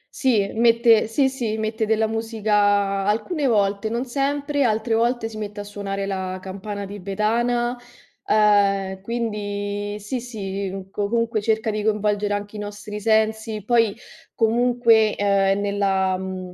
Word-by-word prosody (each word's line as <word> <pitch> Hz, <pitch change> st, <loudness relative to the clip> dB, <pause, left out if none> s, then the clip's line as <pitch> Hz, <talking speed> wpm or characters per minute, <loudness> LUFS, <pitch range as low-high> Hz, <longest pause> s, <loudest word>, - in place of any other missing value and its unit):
Sì 250 Hz, -6 st, +2 dB
e 195 Hz, -, -4 dB
mette 230 Hz, -1 st, +4 dB
sì, 265 Hz, +5 st, +2 dB
sì, 240 Hz, -5 st, -2 dB
mette 220 Hz, 0 st, -2 dB
della 220 Hz, 0 st, +2 dB
musica, 220 Hz, -1 st, -1 dB, 0.5 s
alcune 270 Hz, -, 0 dB
volte, 205 Hz, -2 st, +1 dB
non 235 Hz, +3 st, -2 dB
sempre, 285 Hz, +2 st, -1 dB
altre 225 Hz, -1 st, +1 dB
volte 235 Hz, 0 st, +1 dB
si 225 Hz, -1 st, -9 dB
mette 205 Hz, 0 st, -5 dB
a -, -, -6 dB
suonare 200 Hz, -1 st, -4 dB
la 190 Hz, -1 st, -3 dB
campana 200 Hz, +2 st, -6 dB
tibetana; 220 Hz, +5 st, -1 dB, 0.5 s
ehm, 200 Hz, -2 st, +3 dB
quindi 205 Hz, -2 st, -3 dB
sì, 220 Hz, +5 st, -4 dB
sì, 195 Hz, -4 st, -5 dB
comunque 225 Hz, +2 st, 0 dB
cerca 220 Hz, +1 st, 0 dB
di 215 Hz, 0 st, -2 dB
coinvolgere 210 Hz, -1 st, 0 dB
anche 205 Hz, +1 st, -6 dB
i -, -, -6 dB
nostri 210 Hz, 0 st, -6 dB
sensi. 220 Hz, 0 st, +1 dB
Poi, 230 Hz, -3 st, +2 dB, 0.4 s
comunque, 230 Hz, -1 st, +3 dB
ehm 200 Hz, -1 st, +2 dB
nella 195 Hz, -2 st, +1 dB
mhmm, 185 Hz, -1 st, -6 dB
215 Hz, 140 wpm, -22 LUFS, 200-230 Hz, 0.5 s, mette